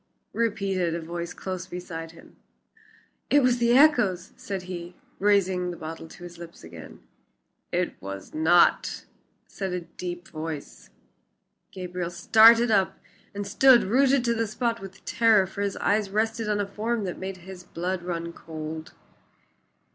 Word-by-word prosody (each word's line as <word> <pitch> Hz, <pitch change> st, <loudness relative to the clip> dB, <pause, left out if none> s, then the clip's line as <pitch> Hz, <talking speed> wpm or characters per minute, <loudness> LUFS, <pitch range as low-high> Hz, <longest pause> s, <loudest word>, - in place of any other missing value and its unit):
repeated 195 Hz, -6 st, 0 dB
a -, -, -2 dB
voice 170 Hz, +1 st, -5 dB
close 185 Hz, -1 st, -6 dB
beside 175 Hz, -2 st, -6 dB
him. 165 Hz, +1 st, -16 dB, 0.9 s
"It 290 Hz, -1 st, +5 dB
was 250 Hz, -1 st, +3 dB
the 235 Hz, +1 st, +4 dB
echoes," 240 Hz, -, +4 dB
said 195 Hz, -2 st, -5 dB
he, 175 Hz, -1 st, -7 dB, 0.2 s
raising 190 Hz, -3 st, +2 dB
the 175 Hz, -, -6 dB
bottle 165 Hz, +1 st, -7 dB
to 175 Hz, -, -13 dB
his 175 Hz, -1 st, -10 dB
lips 170 Hz, -1 st, -11 dB
again. 80 Hz, -1 st, -12 dB, 0.7 s
"It -, -, -2 dB
was 100 Hz, 0 st, -8 dB
not," 165 Hz, +3 st, +3 dB, 0.4 s
said 190 Hz, -2 st, -5 dB
a 180 Hz, -, -2 dB
deep 175 Hz, +1 st, -7 dB
voice. 155 Hz, -2 st, -7 dB, 0.8 s
Gabriel 180 Hz, -2 st, -4 dB
started 225 Hz, +7 st, +6 dB
up 195 Hz, -3 st, +2 dB, 0.4 s
and 205 Hz, 0 st, -3 dB
stood 255 Hz, +4 st, +6 dB
rooted 260 Hz, +4 st, +3 dB
to 235 Hz, -, +2 dB
the 230 Hz, -1 st, -1 dB
spot 230 Hz, +2 st, -1 dB
with 195 Hz, 0 st, -11 dB
terror, 225 Hz, -4 st, +4 dB
for 195 Hz, +2 st, -7 dB
his 200 Hz, -1 st, -1 dB
eyes 205 Hz, 0 st, +1 dB
rested 220 Hz, +2 st, -1 dB
on 210 Hz, -1 st, +1 dB
a 205 Hz, -, 0 dB
form 215 Hz, +3 st, -2 dB
that 180 Hz, -2 st, -4 dB
made 190 Hz, 0 st, -5 dB
his 180 Hz, 0 st, -11 dB
blood 180 Hz, +2 st, -3 dB
run 170 Hz, -1 st, -4 dB
cold. 160 Hz, -1 st, -7 dB
185 Hz, 150 wpm, -26 LUFS, 170-215 Hz, 0.9 s, started